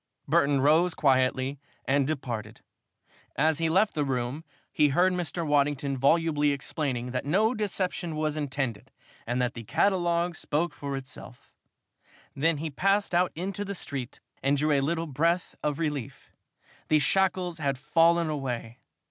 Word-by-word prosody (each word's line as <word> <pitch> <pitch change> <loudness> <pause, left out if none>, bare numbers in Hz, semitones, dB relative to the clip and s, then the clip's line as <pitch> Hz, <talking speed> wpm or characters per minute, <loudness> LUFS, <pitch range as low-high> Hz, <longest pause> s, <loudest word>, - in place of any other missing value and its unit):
Burton 145 -3 +3
rose 160 +5 +4
quietly 130 0 +1 0.3
and 140 0 +2
departed. 125 -8 -4 0.7
As 155 +2 +2
he 165 -1 +1
left 195 +6 +3
the 150 - 0
room, 130 +2 -2 0.3
he 150 - +4
heard 180 +7 +3
Mr. 175 -1 -3
Waddington 145 -2 +1
volubly 150 +2 +2
explaining 135 -3 -3
that 125 0 -2
no 210 - +2
deception 185 -6 -2
was 155 -1 -1
intended 135 -7 -3 0.4
and 120 +2 -1
that 125 0 0
the 115 - -7
catalogue 175 - +1
spoke 155 +1 -1
for 140 -2 -4
itself. 130 -2 -11 0.8
Then 160 +3 +2
he 155 +1 -4
passed 195 +6 +1
out 175 +1 +3
into 195 +4 -3
the 200 0 -5
street 135 -7 -5 0.2
and 140 +1 +2
drew 150 +2 +1
a 140 -2 +3
little 165 +4 -1
breath 165 +5 0
of 150 -1 -1
relief. 150 -7 -4 0.6
The 155 - +4
shackles 180 +1 +1
had 140 -3 -1
fallen 165 +4 +3
away. 130 -5 -4
150 Hz, 150 wpm, -27 LUFS, 135-170 Hz, 0.8 s, rose